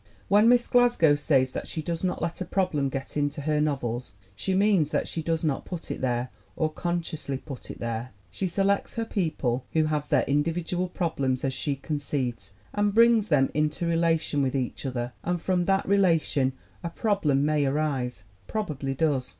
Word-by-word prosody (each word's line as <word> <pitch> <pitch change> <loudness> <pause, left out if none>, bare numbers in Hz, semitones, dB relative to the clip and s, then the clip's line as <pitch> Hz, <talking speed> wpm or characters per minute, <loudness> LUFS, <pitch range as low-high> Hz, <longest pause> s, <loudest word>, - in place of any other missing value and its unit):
When 210 +3 +6
Miss 245 -1 +5
Glasgow 240 -11 +4
says 135 -3 +2
that - - -5
she 160 - -4
does 165 +2 -3
not 180 -3 -1
let 170 +2 -3
a - - -1
problem 160 -9 0
get 135 0 -5
into 145 0 -1
her 150 +1 +1
novels, 125 -7 -2 0.2
she 145 - -1
means 195 -6 +3
that - - -1
she 165 - -3
does 165 0 -1
not 150 -4 0
put 175 -3 -6
it - - -4
there, 125 -1 -1 0.2
or 155 -1 0
consciously 165 -5 -2
put 135 -2 -9
it - - -7
there. 115 +1 -3 0.2
She 190 - -2
selects 195 +3 0
her 230 - -1
people, 155 - -1
who 160 - +3
have 150 -1 -1
their - - +3
individual 165 +5 0
problems 140 -8 -1
as 135 - 0
she 140 +1 -1
concedes, 135 -7 -3 0.2
and 205 0 +1
brings 230 -2 +5
them 135 -6 +3
into 155 +3 0
relation 165 -3 +1
with 135 0 0
each 130 +1 -2
other 120 -1 -3
and 175 0 -1
from 180 +1 0
that 195 +1 +2
relation 165 -9 +2 0.3
a 170 - -2
problem 165 - +1
may 150 -1 +2
arise, 135 -6 -1 0.2
probably 145 -10 -3
does. 135 -4 +1
155 Hz, 185 wpm, -27 LUFS, 135-180 Hz, 0.3 s, When